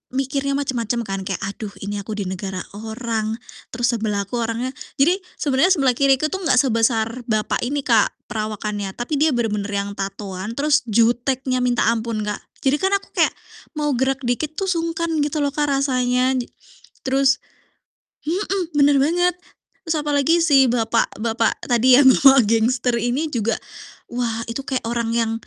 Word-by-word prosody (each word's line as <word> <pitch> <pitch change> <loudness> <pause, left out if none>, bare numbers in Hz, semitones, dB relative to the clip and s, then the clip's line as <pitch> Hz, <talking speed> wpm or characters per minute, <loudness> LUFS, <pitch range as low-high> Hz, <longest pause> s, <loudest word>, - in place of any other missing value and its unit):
mikirnya 275 +1 -1
macem-macem 240 -4 -1
kan 195 0 -3
kayak, 195 -3 -3
"Aduh 205 0 -7
ini 205 +1 -4
aku 210 +2 -6
di - - -1
negara 190 0 -4
orang 220 0 -3 0.4
terus 240 0 +1
sebelah 210 -2 -1
aku 240 - -4
orangnya" 230 +2 -2 0.3
jadi 350 +6 +4 0.2
sebenarnya 290 +6 +2
sebelah 270 -8 +3
kiriku 275 +2 +3
tuh 380 - -2
gak 255 - +4
sebesar 230 -1 0
bapak 215 -2 0
ini 285 +3 -1
Kak, 230 -5 +3 0.2
perawakannya, 210 -3 -3
tapi 245 +6 -3
dia 310 +1 +3
bener-bener 210 -4 -1
yang 200 0 -2
tatoan 195 0 -5
terus 300 +1 +2
juteknya 245 +3 +1
minta 245 -3 +1
ampun 225 -1 -1
Kak. 210 - -2 0.3
Jadi 270 +2 +4
kan 385 +1 +1
aku - - -19
kayak - - +3 0.5
mau 295 -1 0
gerak 265 +1 0
dikit 290 +6 -1
tuh 390 - -1
sungkan 335 -1 -1 0.2
gitu 300 +1 -3
loh 285 - +1
Kak 295 0 0
rasanya 255 -1 +1
di 245 - -3 0.6
terus 265 -1 +3 0.9
mhm, 370 0 -1
bener 285 0 +5
banget, 355 +3 +2 0.5
terus 325 0 0
apalagi 295 +3 +2
si 275 -5 +5
bapak-bapak 230 -1 0
tadi 245 +1 +5
ya - - +7
bapak 265 -2 +7
gangster 235 +3 +1
ini 240 +6 0
juga, 230 -6 -1 0.5
wah 235 -2 -3
itu 230 +4 -4
kayak 260 -3 -3
orang 235 -1 -1
yang 230 -1 +1
245 Hz, 160 wpm, -21 LUFS, 225-280 Hz, 0.9 s, ya